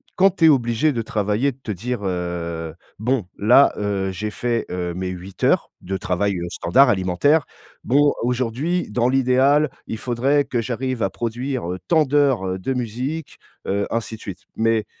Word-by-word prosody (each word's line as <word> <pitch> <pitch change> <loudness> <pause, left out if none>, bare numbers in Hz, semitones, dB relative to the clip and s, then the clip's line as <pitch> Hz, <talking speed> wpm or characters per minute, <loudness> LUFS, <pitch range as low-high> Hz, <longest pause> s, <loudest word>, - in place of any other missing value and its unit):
quand 195 0 +4
tu 165 - +4
es 160 - +8
obligé 125 +2 +2
de 115 - -1
travailler, 110 +3 0
de 130 - -19
te - - -10
dire 115 +5 -3
«Heu, 85 -3 -3 0.2
bon, 120 0 0
là, 120 +7 +6
heu, 100 -2 -1
j'ai 105 +3 -4
fait, 120 0 -1
heu, 90 -1 -3
mes 90 0 -3
8 90 +1 -8
heures - - +3
de 95 +2 -4
travail 95 +3 0 0.2
standard 125 +13 +4
alimentaire, 100 - +2 0.4
bon 145 +3 +3
aujourd'hui 130 +8 -1
dans 120 +3 +1
l'idéal, 135 +3 +3 0.2
il 110 - -4
faudrait 130 +5 +1
que 125 -3 -2
j'arrive 125 +1 -2
à 95 - +1
produire, 120 -2 -3
heu, 90 - -3
tant 160 -2 +4
d'heures 130 -10 +1
de 130 +8 -2
musique, 125 +6 -4 0.3
heu, 100 +1 0
ainsi 115 -1 -2
de 110 - -15
suite», 95 -2 -8
mais 110 -1 +1
115 Hz, 170 wpm, -21 LUFS, 95-135 Hz, 0.4 s, es